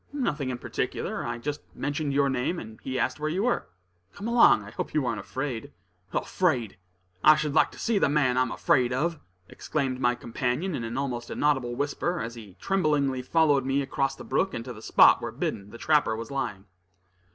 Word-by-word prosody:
"Nothing 150 - -1
in 125 - -3
particular. - - -3
I 120 0 -3
just 145 +5 -4
mentioned 145 0 -2
your 140 0 +3
name, 135 +6 -1
and 110 -6 -9
he 130 0 -3
asked - - 0
where 155 +1 -1
you 185 +6 -1
were. 245 0 0 0.5
Come 200 +2 -5
along; 235 - +6
I 105 - -10
hope - - -5
you 145 -5 +1
ain't 120 - -1
afraid?" 130 -4 -5 0.4
"Afraid! 125 - 0 0.4
I 155 +1 +8
should 150 -1 -1
like 160 - +4
to - - -15
see 225 -3 +1
the - - +3
man 140 -4 +2
I'm 130 -1 +2
afraid 130 -8 +2
of!" 160 +5 -1 0.3
exclaimed 135 0 -2
my 120 -1 +2
companion 125 +9 -2
in 120 - -3
an 115 +2 -4
almost 125 -4 -3
inaudible 135 -5 0
whisper, 145 +6 -1
as 115 +1 -4
he 105 -6 -12
tremblingly 150 -8 +1
followed 145 0 +3
me 135 +2 +1
across 135 0 -1
the - - -10
brook, 190 -7 0
and 115 -1 -5
to 125 - -6
the 110 - -12
spot - - +6
where - - -4
Biddon, 100 0 -3
the 115 - -10
trapper, 150 -5 +2
was 115 +2 -7
lying. 105 -8 -3
135 Hz, 200 wpm, -27 LUFS, 120-155 Hz, 0.5 s, I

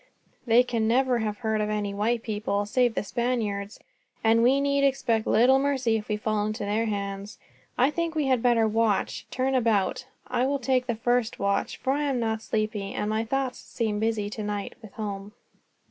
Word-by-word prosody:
They 235 +2 +6
can 230 -3 -1
never 250 +1 +2
have 210 -2 -2
heard 220 -1 -1
of 210 - -1
any 205 -1 -2
white 225 +3 0
people, 205 -1 -1
save 240 +2 +1
the - - -1
Spaniards; 215 -3 -2 0.4
and 225 +1 +4
we 260 +4 +4
need 280 0 +1
expect 240 -5 +1
little 255 +4 +5
mercy 265 -5 +1
if 215 -1 -3
we 210 - -1
fall 215 0 -1
into 215 -1 -3
their 215 +3 0
hands. 200 0 -4 0.4
I 260 +4 +4
think 335 0 -2
we 305 -2 +1
had 260 -3 +2
better 235 -2 +3
watch, 220 -1 0
turn 260 +1 -1
about. 230 -1 +1 0.2
I 255 - 0
will 280 +1 +1
take 255 -1 0
the 235 - 0
first 240 0 0
watch, 200 0 -1
for 265 - 0
I 295 +1 0
am 270 -3 0
not 225 -1 0
at - - +1
all 220 - -2
sleepy, 215 -2 -2
and 210 - -1
my 220 +1 0
thoughts 265 +1 -2
seem 215 -3 -3
busy 220 -2 0
tonight, 205 -1 -4
with 220 -3 -12
home." 205 -1 -5
225 Hz, 200 wpm, -26 LUFS, 210-250 Hz, 0.4 s, They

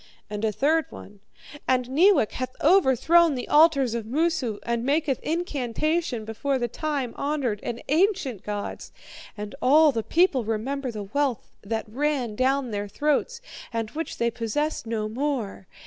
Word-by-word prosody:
"And 210 0 -4
a 220 - +2
third 295 +8 +1
one: 205 0 -12 0.5
'And 255 -1 +2
Neewak 340 - +4
hath 255 0 -5
overthrown 335 - +5
the 250 - -5
altars 295 -6 +4
of 230 -2 -4
Moosu, 270 -5 0
and 235 0 -1
maketh 285 0 +1
incantation 310 -4 -1
before 265 +5 -1
the 240 -1 -1
time 275 -1 -3
honoured 280 -7 -1
and 235 -1 -5
ancient 315 - +1
gods. 205 -1 -5 0.5
And 205 0 -6
all 300 +4 +6
the 230 -4 -1
people 315 - +2
remember 250 +5 -2
the 215 -3 -5
wealth 260 +4 -2
that 220 +2 -3
ran 260 -1 -1
down 260 +1 +1
their 205 0 -3
throats, 300 - -1 0.3
and 225 -2 -3
which 325 +2 -5
they 235 0 +1
possess 235 +4 -2
no 220 -2 -2
more. 230 -5 -3
260 Hz, 150 wpm, -25 LUFS, 225-300 Hz, 0.5 s, all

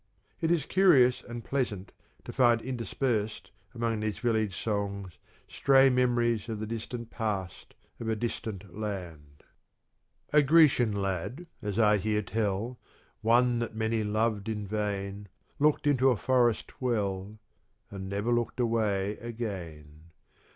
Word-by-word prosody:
It 165 - 0
is 165 -4 +2
curious 140 -10 +5
and 120 -1 -8
pleasant 115 -9 -2 0.3
to - - -7
find 120 -3 +4
interspersed 115 -5 -2 0.2
among 115 -2 -1
these 105 -1 -2
village 110 -5 0
songs 100 -3 -3 0.3
stray 135 -1 +4
memories 120 -3 +1
of 110 -2 -3
the 110 - -3
distant 115 +1 -6
past 100 -6 -4 0.2
of 115 - -4
a 110 - +1
distant 105 -4 -5
land: 85 -9 -6 0.9
A 150 - +7
Grecian 145 -6 +5
lad, 100 - -3 0.2
as 105 -2 -3
I 105 -2 +5
hear 105 +1 0
tell, 110 +3 -2 0.4
One 120 +2 +3
that 115 -2 -4
many 110 0 0
loved 110 0 0
in 105 -2 -3
vain, 100 -1 -3 0.3
Looked 150 0 +3
into 135 -2 +4
a 125 - +2
forest 120 0 +1
well 105 -4 -1 0.5
And 95 -1 -6
never 100 +4 -1
looked 120 +1 -1
away 105 -4 0
again. 85 -10 -7
110 Hz, 130 wpm, -29 LUFS, 100-120 Hz, 0.9 s, A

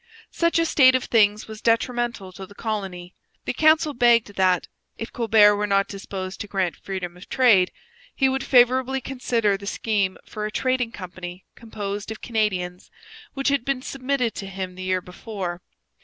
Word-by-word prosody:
Such 335 0 +1
a 330 - +3
state 260 -5 +5
of 255 - +1
things 210 -2 +2
was 220 0 -9
detrimental 235 -3 0
to 190 +1 -10
the 205 - -16
colony. 190 -6 -5 0.3
The - - -1
council 310 -1 +4
begged 235 -4 +3
that, 185 -2 +2 0.3
if 225 - -7
Colbert 220 -3 +5
were 210 0 -1
not 195 -1 +2
disposed 195 -1 -6
to 205 - -5
grant 190 -5 -1
freedom 185 -3 -6
of 180 - -14
trade, 220 -9 +4 0.4
he 270 - +3
would 265 0 -1
favourably 255 +1 +4
consider 240 -6 0
the 200 0 -10
scheme 200 -3 -1
for 210 0 -4
a - - -7
trading 255 0 0
company 180 -1 -9
composed 205 -3 -6
of 220 - -6
Canadians, 185 -6 -2 0.5
which 275 0 0
had 280 -3 +1
been 265 -1 -2
submitted 260 -3 -1
to 195 - -5
him 190 -1 -5
the 185 - -10
year 185 0 0
before. 180 -1 -6
210 Hz, 170 wpm, -23 LUFS, 190-250 Hz, 0.5 s, state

